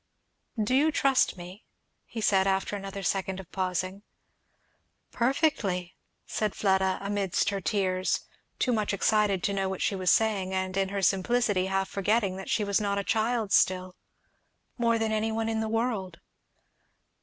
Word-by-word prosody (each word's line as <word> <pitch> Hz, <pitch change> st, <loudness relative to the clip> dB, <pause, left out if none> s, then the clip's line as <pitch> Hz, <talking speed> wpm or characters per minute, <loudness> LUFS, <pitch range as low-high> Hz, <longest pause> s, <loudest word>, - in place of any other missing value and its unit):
"Do 215 Hz, +4 st, 0 dB
you 295 Hz, +4 st, +4 dB
trust 275 Hz, -7 st, +2 dB
me?" 180 Hz, +4 st, -10 dB, 0.4 s
he 225 Hz, -, -6 dB
said 195 Hz, -2 st, +3 dB
after 195 Hz, +1 st, 0 dB
another 195 Hz, 0 st, -6 dB
second 190 Hz, 0 st, -1 dB
of 190 Hz, -, -11 dB
pausing. 185 Hz, +1 st, -2 dB, 1.1 s
"Perfectly!" 235 Hz, -, 0 dB, 0.3 s
said 215 Hz, -2 st, -2 dB
Fleda 190 Hz, -2 st, +2 dB
amidst 200 Hz, -2 st, 0 dB
her 200 Hz, -1 st, -3 dB
tears, 185 Hz, -1 st, 0 dB, 0.4 s
too 250 Hz, -, +1 dB
much 215 Hz, -2 st, 0 dB
excited 205 Hz, -2 st, +2 dB
to 200 Hz, -, 0 dB
know 195 Hz, -1 st, -1 dB
what 190 Hz, -, -3 dB
she 200 Hz, -, 0 dB
was 185 Hz, -1 st, 0 dB
saying, 195 Hz, -3 st, +2 dB
and 185 Hz, 0 st, -2 dB
in 195 Hz, -1 st, +1 dB
her 200 Hz, 0 st, -3 dB
simplicity 195 Hz, 0 st, +2 dB
half 195 Hz, 0 st, 0 dB
forgetting 200 Hz, 0 st, 0 dB
that 190 Hz, -, -7 dB
she 215 Hz, -, +1 dB
was 200 Hz, +1 st, +1 dB
not 200 Hz, -1 st, 0 dB
a 200 Hz, -, -1 dB
child 220 Hz, -1 st, 0 dB
still; 185 Hz, 0 st, +2 dB, 0.8 s
"more 230 Hz, -1 st, +2 dB
than 225 Hz, -1 st, -1 dB
any 220 Hz, +1 st, 0 dB
one 225 Hz, 0 st, -1 dB
in 225 Hz, -1 st, -1 dB
the 220 Hz, 0 st, -2 dB
world!" 220 Hz, -6 st, -2 dB
200 Hz, 160 wpm, -28 LUFS, 190-220 Hz, 1.1 s, you